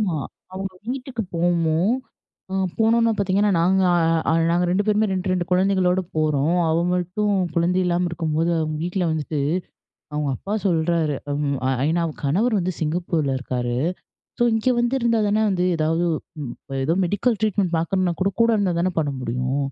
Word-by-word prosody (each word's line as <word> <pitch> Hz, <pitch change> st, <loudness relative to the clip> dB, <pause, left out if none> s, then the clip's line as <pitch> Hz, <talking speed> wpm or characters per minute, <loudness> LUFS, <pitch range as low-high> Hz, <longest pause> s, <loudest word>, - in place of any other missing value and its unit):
ஆமா 185 Hz, -7 st, 0 dB, 0.4 s
அவங்க 190 Hz, 0 st, -4 dB, 0.2 s
வீட்டுக்கு 255 Hz, -2 st, -3 dB
போனோம். 170 Hz, +4 st, +2 dB, 0.6 s
அ -, -, -2 dB, 0.2 s
போனோன்ன 230 Hz, +1 st, +3 dB
பார்த்தீங்கன்னா, 200 Hz, +1 st, +2 dB
நாங்க 190 Hz, +2 st, +3 dB, 0.5 s
அ -, -, +3 dB, 0.2 s
நாங்க 175 Hz, +1 st, +2 dB
2 195 Hz, +3 st, +1 dB
பேருமே 215 Hz, +1 st, +3 dB
2 185 Hz, 0 st, -1 dB
2 180 Hz, -1 st, 0 dB
குழந்தைகளோடு 185 Hz, 0 st, +2 dB
போறோம். 155 Hz, +2 st, +1 dB
அவ 160 Hz, -, +2 dB, 0.2 s
மட்டும் 185 Hz, +4 st, -1 dB, 0.2 s
குழந்தை 175 Hz, +2 st, +2 dB
இல்லாம 175 Hz, 0 st, +1 dB
இருக்கும்போது 165 Hz, 0 st, -1 dB
அவங்க 155 Hz, -1 st, -2 dB
வீட்ல 180 Hz, +1 st, -1 dB
வந்துட்டு, 155 Hz, -1 st, -2 dB, 0.7 s
அவங்க 150 Hz, -1 st, -1 dB
அப்பா 200 Hz, -, -5 dB
சொல்றாரு, 165 Hz, -4 st, +1 dB, 0.7 s
ஐ -, -, +2 dB
நா -, -, +1 dB
அவங்க 155 Hz, -, -5 dB
கணவர் 210 Hz, -, +2 dB
வந்து 180 Hz, 0 st, -1 dB
சிங்கப்பூர்ல 160 Hz, -3 st, 0 dB
இருக்காரு. 125 Hz, -2 st, -2 dB, 0.7 s
ஸோ -, -, +5 dB
இங்கே 225 Hz, +3 st, +1 dB
வந்து 240 Hz, +2 st, +1 dB
இருந்தா 230 Hz, -2 st, +2 dB
தானே 210 Hz, +1 st, +2 dB
வந்து 180 Hz, -2 st, 0 dB
ஏதாவது 160 Hz, +2 st, +1 dB, 0.8 s
ஏதோ 160 Hz, -, +1 dB
மெடிக்கல் 205 Hz, +6 st, +1 dB
ட்ரீட்மெண்ட் 200 Hz, -4 st, +1 dB
பார்க்கணும்னா 180 Hz, +1 st, 0 dB
கூட, 195 Hz, -, +2 dB
கூட 230 Hz, -, +5 dB
இருந்தா 195 Hz, -4 st, +1 dB
தானே 185 Hz, +2 st, +1 dB
பண்ண 145 Hz, -2 st, 0 dB
முடியும். 125 Hz, +3 st, -2 dB
180 Hz, 155 wpm, -22 LUFS, 160-205 Hz, 0.8 s, ஸோ